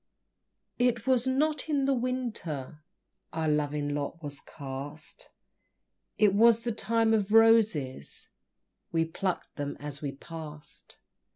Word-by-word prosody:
It 245 Hz, -2 st, +2 dB
was 260 Hz, -1 st, +3 dB
not 295 Hz, +3 st, +1 dB
in 285 Hz, -3 st, +2 dB
the 275 Hz, -, +3 dB
Winter 230 Hz, -, -3 dB, 0.5 s
Our 160 Hz, -1 st, -1 dB
loving 150 Hz, -1 st, 0 dB
lot 145 Hz, +3 st, -4 dB
was 145 Hz, -1 st, -6 dB
cast; 140 Hz, +2 st, -8 dB, 0.9 s
It 210 Hz, -2 st, +5 dB
was 230 Hz, +2 st, +5 dB
the 235 Hz, -, 0 dB
Time 225 Hz, +1 st, +2 dB
of 210 Hz, -2 st, +1 dB
Roses, 220 Hz, -, +3 dB, 0.6 s
We 165 Hz, -1 st, +2 dB
plucked 180 Hz, +3 st, -3 dB
them 145 Hz, -1 st, -3 dB
as 145 Hz, -1 st, -6 dB
we 140 Hz, -2 st, -3 dB
passed! 150 Hz, 0 st, -10 dB
170 Hz, 120 wpm, -29 LUFS, 145-230 Hz, 0.9 s, It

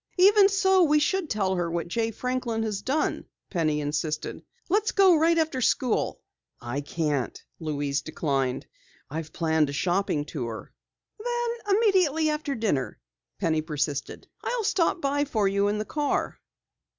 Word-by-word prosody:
"Even 395 Hz, +2 st, +7 dB
so, 380 Hz, -1 st, +3 dB
we 300 Hz, -3 st, +4 dB
should 330 Hz, +2 st, +1 dB
tell 195 Hz, -3 st, 0 dB
her 175 Hz, -2 st, -1 dB
what 170 Hz, +1 st, -2 dB
Jay 225 Hz, +5 st, -1 dB
Franklin 240 Hz, -1 st, -2 dB
has 210 Hz, -3 st, -2 dB
done," 285 Hz, +7 st, -1 dB, 0.3 s
Penny 155 Hz, -5 st, +1 dB
insisted. 150 Hz, +1 st, -3 dB, 0.3 s
"Let's 415 Hz, +4 st, +1 dB
go 385 Hz, -3 st, +6 dB
right 330 Hz, +2 st, +3 dB
after 315 Hz, -5 st, 0 dB
school." 250 Hz, 0 st, +1 dB, 0.4 s
"I 120 Hz, +4 st, -4 dB
can't," 145 Hz, -3 st, -2 dB, 0.2 s
Louise 145 Hz, -3 st, -2 dB
declined. 135 Hz, -5 st, -1 dB, 0.5 s
"I've 160 Hz, 0 st, -5 dB
planned 160 Hz, -3 st, +1 dB
a -, -, -4 dB
shopping 175 Hz, -2 st, 0 dB
tour." 120 Hz, -8 st, -6 dB, 0.5 s
"Then, 475 Hz, -4 st, -1 dB
immediately 360 Hz, -8 st, +3 dB
after 300 Hz, -2 st, -2 dB
dinner," 145 Hz, -, -1 dB, 0.4 s
Penny 160 Hz, -1 st, +1 dB
persisted. 150 Hz, -2 st, -3 dB, 0.2 s
"I'll 485 Hz, -2 st, -1 dB
stop 370 Hz, -4 st, +1 dB
by 285 Hz, +1 st, +1 dB
for 220 Hz, -8 st, 0 dB
you 200 Hz, +1 st, +2 dB
in 205 Hz, +1 st, 0 dB
the 215 Hz, -, -2 dB
car." 295 Hz, +3 st, -1 dB
215 Hz, 145 wpm, -26 LUFS, -, 0.5 s, Even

